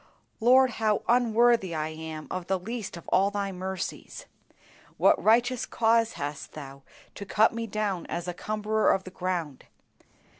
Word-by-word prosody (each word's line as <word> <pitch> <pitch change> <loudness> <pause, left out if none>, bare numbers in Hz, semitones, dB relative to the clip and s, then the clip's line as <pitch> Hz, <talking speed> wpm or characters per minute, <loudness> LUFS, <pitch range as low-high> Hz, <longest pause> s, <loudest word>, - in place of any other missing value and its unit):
Lord, 255 +2 +5
how 215 -2 0
unworthy 235 -5 +3
I 155 0 -2
am 160 -1 -7
of 185 -1 -4
the 190 - +1
least 215 0 -6
of 170 - -13
all 195 +2 +3
Thy 200 -1 -3
mercies! 190 0 -6 0.7
What - - +4
righteous 240 +3 +3
cause 230 0 +2
hast 145 0 -6
Thou 140 -2 -9 0.3
to - - -8
cut 215 +3 +3
me 230 0 -4
down 205 -4 -2
as 175 +1 -4
a 180 - -3
cumberer 215 +3 0
of 190 - 0
the 185 - -10
ground. 175 -7 -4
200 Hz, 155 wpm, -27 LUFS, 175-225 Hz, 0.7 s, Lord